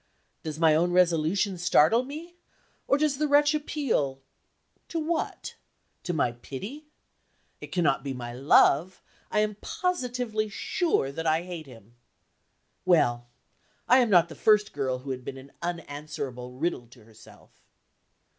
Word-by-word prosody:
Does 155 -1 -5
my 160 -2 +5
own 170 +3 +2
resolution 180 +2 +2
startle 175 +6 +4
me? 315 +6 -9 0.5
Or 275 - +4
does 290 -2 0
the 305 - +2
wretch 290 +1 +4
appeal 275 - -1 0.7
to 335 - -4
what? 320 +1 -3 0.5
To - - -1
my 150 -7 +1
pity? 200 - -8 0.7
It - - -8
cannot 145 -7 +1
be 140 - -3
my 120 -2 -6
love; 145 +6 +3 0.3
I 210 - +2
am 210 -1 -1
positively 245 -11 -2
sure 210 - 0
that 165 +3 -4
I 160 +2 +2
hate 175 -4 -7
him. 115 -2 -16 0.9
Well, 120 -10 +2 0.6
I 255 - +6
am 240 -3 +3
not 175 -4 +5
the 165 - -10
first 210 +2 +3
girl 130 -3 -1
who 135 +2 -7
had 130 -1 -5
been 135 - -7
an 135 +1 -13
unanswerable 145 -7 -5
riddle 145 -5 -2
to 120 -1 -18
herself. 110 0 -19
170 Hz, 145 wpm, -27 LUFS, -, 0.9 s, I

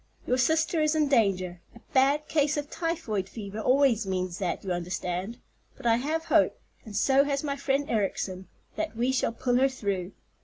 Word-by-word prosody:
Your 250 +1 +1
sister 320 +3 +2
is 305 0 +2
in 305 -2 +2
danger—a 195 -3 0
bad 280 +3 +3
case 300 -1 +1
of 290 0 -4
typhoid 320 - -2
fever 205 0 -7
always 250 -3 +3
means 185 -2 -2
that, 180 -4 -2
you 190 - -3
understand; 180 +4 -3 0.4
but - - -13
I 230 -1 +4
have 310 +6 -2
hope, - - +3 0.2
and 215 -4 -9
so 270 +4 +4
has 280 0 -1
my 280 -2 -1
friend 280 0 0
Ericson, 190 -5 -2 0.3
that 220 - -3
we 245 +3 +1
shall 260 -3 +1
pull 245 +1 0
her 270 +1 +4
through. 200 -7 -3
240 Hz, 180 wpm, -28 LUFS, 195-280 Hz, 0.4 s, I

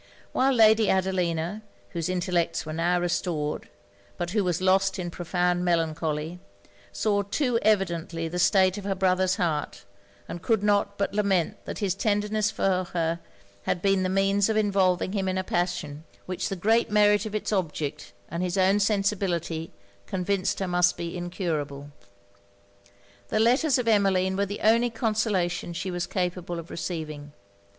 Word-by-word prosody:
While 265 +1 +2
Lady 220 -2 +5
Adelina, 185 0 0 0.3
whose 170 -1 -3
intellects 175 -3 0
were 155 - -5
now 175 +2 +1
restored, 170 -3 -2 0.5
but 175 -1 -3
who 210 0 +1
was 175 -2 0
lost 190 +1 +2
in 175 -2 -4
profound 175 +1 0
melancholy, 160 -1 -1 0.5
saw 205 -2 +1
too 230 +4 0
evidently 170 -5 0
the 175 +2 -4
state 190 +1 +3
of - - -9
her 195 -1 -1
brother's 185 -1 +2
heart; 160 - -2 0.4
and 175 - -6
could 220 0 +1
not 200 -1 +1
but 200 - -1
lament 200 -5 0
that - - -5
his 200 -4 0
tenderness 210 +1 0
for 185 -3 0
her 165 -1 0 0.5
had - - 0
been 195 -1 +3
the 185 - 0
means 195 +2 +2
of 220 - +1
involving 190 -4 +2
him 195 -2 -1
in 185 0 -1
a 185 - 0
passion, 175 -5 -2 0.2
which 185 -1 -3
the 195 - -2
great 220 +5 +2
merit 210 0 +4
of 215 - -6
it's 215 - -2
object, 155 -6 -3 0.2
and 170 +3 -4
his 180 +1 -1
own 190 +2 +4
sensibility, 195 -6 0 0.4
convinced 190 0 -1
her 190 - -1
must 180 0 +2
be 170 0 -5
incurable. 155 -6 -4 1.4
The - - 0
letters 255 +6 +3
of 245 -2 -2
Emmeline 190 -3 +3
were 200 +1 0
the 205 +2 -6
only 230 +2 +4
consolation 215 -7 -1
she 185 +2 -4
was 175 0 -3
capable 180 -1 -2
of 170 0 -8
receiving. 155 -4 -5
185 Hz, 160 wpm, -26 LUFS, 175-205 Hz, 1.4 s, Lady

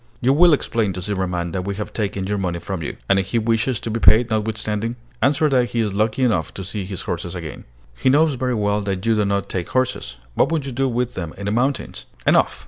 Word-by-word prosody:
"You 130 +2 +3
will 170 +4 +6
explain 115 -8 +1
to 90 - -5
Zimmerman 90 -3 -2
that 95 - -2
we 100 0 -2
have 105 +1 -5
taken 100 -3 -2
your 100 +1 -1
money 90 -3 -1
from 95 0 -5
you." 75 - -5
"And 100 0 +4
if 95 - -2
he 110 - 0
wishes 115 +1 +1
to 115 - -3
be 115 - -1
paid, 115 +1 +5
notwithstanding?" 110 +1 -1 0.3
"Answer 145 +3 +3
that 130 -3 +3
he 120 - -2
is 105 -3 0
lucky 110 +5 +1
enough 95 -11 +1
to 95 - -5
see 100 +1 -4
his 95 -2 -5
horses 85 +1 -4
again." 80 -4 -7 0.3
"He - - +2
knows 150 +3 +4
very 125 -1 -1
well 105 -1 +1
that 95 -1 -3
you 115 - +4
do 105 -1 +2
not 100 -1 0
take 90 -2 -3
horses. 130 - -1 0.2
What 140 - +2
would 155 -4 0
you 135 - -4
do 135 +2 0
with 125 0 -1
them 85 -4 -5
in 100 - -6
the 100 - 0
mountains?" 130 +5 -1 0.2
"Enough! - - +3
105 Hz, 245 wpm, -21 LUFS, 95-125 Hz, 0.3 s, will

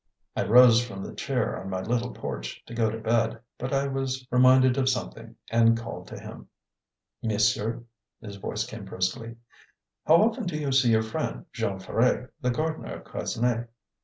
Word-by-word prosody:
I - - 0
rose 120 +1 +7
from 95 -5 -7
the - - -7
chair - - -2
on 95 - -7
my 95 -1 -2
little 120 +3 -1
porch, - - -6
to - - -10
go 115 -1 +1
to 110 - -4
bed; 115 0 0 0.2
but 125 +2 -3
I 140 0 +1
was 135 -1 -2
reminded 130 0 +6
of 135 -1 +2
something, 125 - -4 0.2
and 115 0 +4
called 115 0 -7
to - - -8
him. - - -10 0.7
"Monsieur?" 110 +1 +1 0.4
his 100 -2 -9
voice 105 +2 -3
came 110 -3 -8
briskly. 95 +5 -3 0.7
"How 160 - +7
often 215 +1 +2
do 160 -3 -2
you 145 -2 -2
see 130 -2 +4
your 110 -1 +4
friend, 110 - -4
Jean 95 - -2
Ferret, 125 +6 0
the 125 - +1
gardener 155 +6 -2
of - - -10
Quesnay?" 120 0 -2
115 Hz, 175 wpm, -27 LUFS, 110-130 Hz, 0.7 s, rose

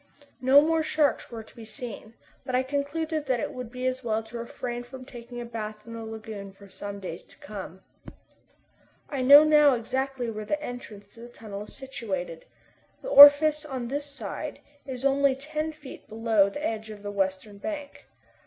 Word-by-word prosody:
No 265 +3 +7
more 320 +1 +2
sharks 310 -2 +1
were 230 -2 -7
to - - -19
be 230 - -10
seen, 225 -1 -9 0.3
but 255 -1 -2
I 255 - +3
concluded 290 +3 -2
that 255 -2 +1
it - - -3
would 250 -2 -7
be 250 0 -5
as 255 0 -1
well 225 -1 -1
to 230 +2 -8
refrain 240 +1 -5
from 255 +1 -10
taking 240 -1 -9
a 240 - -5
bath 215 -2 -6
in 230 - -9
the 230 0 -6
lagoon 220 -3 -8
for 200 +1 -16
some 200 +1 -7
days 180 -3 -7
to - - -21
come. 190 -2 -9 1.3
I 275 -3 -2
now 285 +4 +9
know 300 -3 +6
exactly 260 +1 -2
where 215 -1 -5
the 300 +8 -1
entrance 220 -7 -9
to - - -16
the 240 +1 -10
tunnel 210 -4 -8
is - - -12
situated. 190 -11 -5 0.6
The - - -4
orifice 300 -1 +9
on 260 -5 -5
this 285 +2 -3
side 285 0 -6 0.3
is 260 0 -5
only 275 0 +3
ten 305 +3 -4
feet 300 -3 -12
below 220 -2 +2
the 290 +9 -5
edge 220 -3 -3
of 210 -1 -10
the 205 - -4
western 195 +1 -2
bank. 295 +1 -6
245 Hz, 190 wpm, -27 LUFS, 215-280 Hz, 1.3 s, now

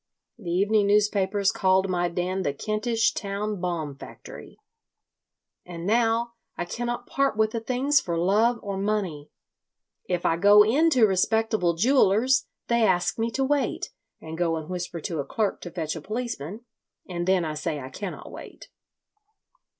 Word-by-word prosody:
The 185 -6 -7
evening 200 +4 +2
newspapers 205 -1 +2
called 190 0 +2
my 175 -1 0
den 180 +2 -2
the 140 -6 -2
Kentish 225 - 0
Town 205 0 -3
Bomb 165 -6 -3
Factory. - - -11 1.0
And 170 -1 -8
now 230 +2 +1 0.2
I - - -2
cannot 240 +6 -4
part 275 -5 0
with 220 0 +2
the 230 - -2
things 260 +5 +1
for 170 -2 -3
love 215 +7 +2
or 200 -2 -4
money. 195 -8 -2 0.8
"If 180 -1 -1
I 165 - +2
go 205 +3 +7
in 295 +10 +3
to 250 -8 +5
respectable 205 -2 +1
jewellers 255 +4 +3 0.2
they 235 0 +2
ask 180 0 +1
me 225 +1 0
to 270 +4 -1
wait, 285 +1 -1 0.3
and 160 +1 -8
go 165 -2 +1
and 160 -1 -6
whisper 175 -1 -4
to 165 -1 -4
a - - 0
clerk 205 +8 -2
to 175 - -7
fetch 160 -2 -3
a 160 - -6
policeman, 215 - -5 0.5
and 175 -1 -4
then 185 -2 +3
I 155 - -3
say 150 0 -3
I 130 -1 -8
cannot 185 +7 -7
wait. - - -11
200 Hz, 160 wpm, -25 LUFS, 175-225 Hz, 1.0 s, go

